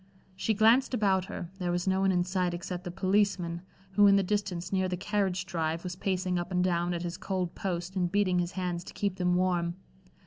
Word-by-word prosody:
She 215 +3 0
glanced 230 +5 +4
about 195 -4 +2
her; 175 -2 -7
there 175 -1 -1
was 175 +1 -1
no 190 0 +2
one 195 0 +3
in 180 -1 +2
sight 180 -1 -1
except 180 +1 -5
the - - -3
policeman, 190 -2 +1 0.3
who 205 +1 +6
in 200 - +6
the 195 - +3
distance 195 -2 -2
near 190 -1 +1
the 180 - -2
carriage 190 -1 -1
drive, 165 -2 -2
was 180 -1 -4
pacing 185 -1 -1
up 175 +2 -5
and 180 0 +2
down 175 -1 +1
at 170 - -3
his 175 0 -4
cold 185 -3 -2
post 180 0 -3
and 180 -2 0
beating 190 -3 +2
his 175 +1 -2
hands 180 -2 -2
to - - -10
keep 200 -2 -1
them 180 -1 +2
warm. 175 -2 +1
185 Hz, 220 wpm, -29 LUFS, 175-195 Hz, 0.3 s, who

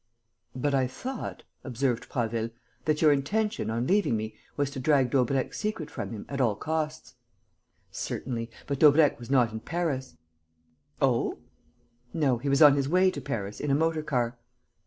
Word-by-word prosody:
"But 140 +3 0
I 130 -2 +2
thought," 255 - -6 0.2
observed 125 -2 -1
Prasville, 115 -2 -1 0.4
"that 155 0 +1
your 155 - +7
intention, 205 - 0
on 115 +2 -1
leaving 190 - +2
me, 110 0 -4 0.2
was 145 -1 0
to 140 - -6
drag 130 -2 +3
Daubrecq's 130 0 +1
secret 210 -8 -3
from - - -5
him 110 -3 -7
at 140 -1 -2
all 115 -5 +2
costs." 155 +4 -3 0.8
"Certainly. 115 -3 -4 0.2
But 140 -1 -3
Daubrecq 150 -2 +6
was 120 - -10
not 125 -4 +3
in 110 - -5
Paris." 140 - -3 0.9
"Oh?" - - +2 0.8
"No. 135 -7 +2
He 140 +3 -2
was 140 +2 +5
on 145 -2 +8
his 140 0 0
way 185 +2 +4
to 145 - -6
Paris 105 -5 -4
in 150 - -2
a 140 - +4
motor 160 +1 +1
car." 125 -5 -1
140 Hz, 165 wpm, -28 LUFS, 120-155 Hz, 0.9 s, on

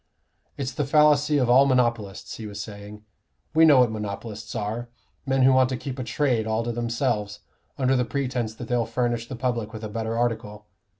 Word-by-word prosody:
"It's 135 -2 -3
the 150 - -2
fallacy 150 0 +4
of 130 -3 +2
all 130 +3 +6
monopolists," 120 -6 0
he 110 - -7
was 100 0 -8
saying. 105 0 -9 0.5
"We 160 +1 +6
know 145 -5 +7
what 120 -3 +3
monopolists 105 +1 -6
are: 110 +3 -3 0.4
men 135 0 +2
who 130 +1 +6
want 130 0 +4
to 130 - -2
keep 130 +2 -6
a - - -2
trade 115 -2 0
all 110 +1 0
to 120 - -2
themselves, 115 -3 -2 0.4
under 130 0 +2
the 125 - +2
pretence 125 -3 -2
that 120 0 -8
they'll 120 -1 0
furnish 120 0 -1
the 130 - -6
public 120 -3 -2
with 110 0 -7
a 110 - -4
better 115 +1 -3
article. 110 -3 -2
120 Hz, 195 wpm, -25 LUFS, 110-130 Hz, 0.5 s, know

